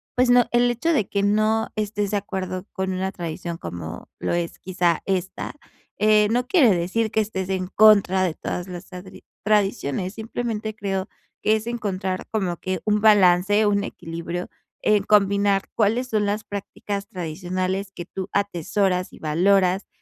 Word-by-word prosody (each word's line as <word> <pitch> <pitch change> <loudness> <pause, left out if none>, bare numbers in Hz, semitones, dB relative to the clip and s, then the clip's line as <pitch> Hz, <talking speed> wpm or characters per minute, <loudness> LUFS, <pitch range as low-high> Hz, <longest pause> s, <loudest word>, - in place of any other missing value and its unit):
pues 250 0 +3
no 245 -1 +6
el 240 0 +3
hecho 285 +8 0
de 215 -10 +1
que 200 -1 -1
no 215 +2 +2
estés 210 -1 -1
de 205 - +1
acuerdo 190 -1 -4
con 190 -1 -2
una 190 +1 -2
tradición 170 0 -5
como 85 - -7
lo - - -1
es 170 -1 -2
quizá 175 -3 0
esta, 190 +5 -3 0.4
eh, 210 0 +5
no 245 +2 +1
quiere 260 - +5
decir 195 +6 0
que 220 - +2
estés 190 -3 -3
en 185 -1 -1
contra 200 -2 +5
de 175 -4 0
todas 180 +1 -4
las 180 0 -8
tadri 185 0 -11 0.2
tradiciones, 195 -4 +1
simplemente 220 -1 -4
creo 195 -2 -2 0.4
que 215 - +4
es 220 0 -3
encontrar 195 -6 -3
como 185 -6 -1
que 185 -2 -3
un 210 0 +2
balance, 205 0 +5
un 200 -1 +2
equilibrio 170 +2 -5 0.4
en 210 -2 +3
combinar 200 -1 +3
cuáles 230 +4 +1
son 215 -2 +1
las 210 +2 -1
prácticas 200 0 -5
tradicionales 185 +3 -3
que 175 - -7
tú 190 +1 -6
atesoras 190 -1 0
y - - -12
valoras, 185 +4 +2
195 Hz, 160 wpm, -23 LUFS, 185-215 Hz, 0.4 s, no